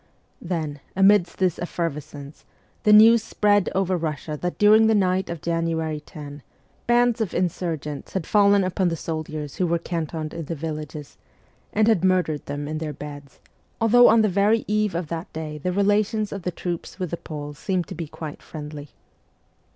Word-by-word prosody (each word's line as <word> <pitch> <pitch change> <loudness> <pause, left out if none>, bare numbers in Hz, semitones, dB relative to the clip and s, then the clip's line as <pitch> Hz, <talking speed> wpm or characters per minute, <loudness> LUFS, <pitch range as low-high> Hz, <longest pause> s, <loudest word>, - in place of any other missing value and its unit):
Then, 160 -5 -3 0.2
amidst 195 -1 +4
this 185 -3 +1
effervescence, 150 -4 -5 0.4
the 210 - +3
news 220 +2 +8
spread 205 -3 +2
over 190 -1 +1
Russia 155 -2 -3
that 180 0 -3
during 215 +1 +6
the 220 - +4
night 185 -1 +1
of 170 -2 -6
January 165 -2 -1
10 145 -1 -10 0.5
bands 240 -1 +3
of 210 - -2
insurgents 165 -5 -3
had 190 -5 -2
fallen 200 -1 +4
upon 185 0 0
the 170 - 0
soldiers 155 -2 -5
who 180 - +1
were 170 +1 +1
cantoned 160 -2 -4
in 165 -2 -5
the 165 - -4
villages, 150 -1 -6 0.5
and 215 +1 +2
had 215 -6 +3
murdered 180 -5 +1
them 145 +1 -4
in 155 +1 -3
their 155 -2 -4
beds, 145 -1 -10 0.4
although 245 +2 +6
on 225 0 +5
the - - +4
very 205 +3 +2
eve 210 -2 0
of 170 0 -1
that 165 0 -5
day 155 -1 -5
the 180 +5 -2
relations 205 +2 +1
of 200 - -5
the 180 - -2
troops 175 0 -5
with 180 -4 -4
the 170 - -2
Poles 145 -3 -8
seemed 185 -3 -1
to - - -7
be 165 -1 -5
quite 150 0 -8
friendly. 150 -2 -8
170 Hz, 175 wpm, -24 LUFS, 155-200 Hz, 0.5 s, news